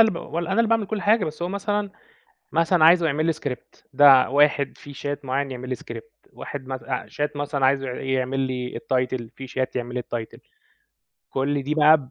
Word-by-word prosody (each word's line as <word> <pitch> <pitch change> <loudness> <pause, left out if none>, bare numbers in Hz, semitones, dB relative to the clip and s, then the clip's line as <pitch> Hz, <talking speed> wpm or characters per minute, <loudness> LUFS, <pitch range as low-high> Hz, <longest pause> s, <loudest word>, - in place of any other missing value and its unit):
اللي 220 -2 +6
ب - - -6
و 165 - -5
أنا 170 +1 -3
اللي 230 +2 +3
باعمل 225 -3 +2
كل 210 -3 -3
حاجة 210 +1 +3
بس 155 +2 -6
هو 175 - -1
مثلًا 200 +1 -2 0.6
مثلًا 165 0 +3
عايزه 170 0 +6
يعمل 155 +1 +1
لي 165 - +2
script، 140 -5 -7
ده 135 -2 +7
واحد 140 0 +2
في 145 - -11
شات 145 +1 -5
معيّن 135 +1 -1
يعمل 130 0 -6
لي 130 - -1
script، 450 - -11
واحد 135 -2 -7
مت 130 -3 -5
آآ 125 0 -3
شات 150 0 -3
مثلًا 145 -2 0
عايزه 135 0 +2
ع 125 - -4
يعمل 130 0 -1
لي 125 -2 -3
الtitle، 130 -4 -1
في 135 -1 -8
شات 130 0 -3
يعمل 125 0 -4
لي 125 - -1
الtitle. 115 -2 -6 0.9
كل 140 +1 -1
دي 150 +3 -2
بقى 155 0 +7
145 Hz, 210 wpm, -24 LUFS, 130-165 Hz, 0.9 s, ده